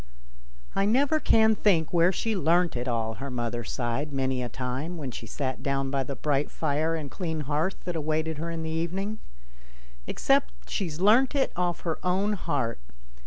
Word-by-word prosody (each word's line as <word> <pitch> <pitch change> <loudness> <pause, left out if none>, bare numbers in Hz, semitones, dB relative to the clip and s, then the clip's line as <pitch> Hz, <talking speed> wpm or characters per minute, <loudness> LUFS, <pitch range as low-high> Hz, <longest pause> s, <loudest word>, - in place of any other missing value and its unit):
" - - -25 0.3
I 195 - +3
never 280 +7 +3
can 220 -5 +5
think 180 -7 +2
where 170 +1 +5
she 220 +3 -1
learnt 175 -1 +3
it 125 +1 -2
all," 115 -2 0
her 140 - -4
mother 120 -1 -2
sighed 120 +6 -2
many 130 -2 0
a 120 - -3
time 130 +8 -3
when 140 -5 -4
she 115 - -7
sat 130 +3 -3
down 135 -1 0
by 140 -1 +1
the 135 +1 -4
bright 145 +2 0
fire 155 +1 0
and 150 -4 -5
clean 160 -4 -3
hearth 150 +6 0
that 175 -2 -3
awaited 155 0 -1
her 165 +2 -3
in 165 -1 -3
the 160 - -3
evening, 190 +6 -2 0.9
"except - - +1
she's 165 -5 -2
learnt 235 +9 +5
it 275 - +2
off 175 -1 -1
her 165 -2 -2
own 195 +3 +1
heart. 135 - -1
160 Hz, 185 wpm, -27 LUFS, 135-180 Hz, 0.9 s, can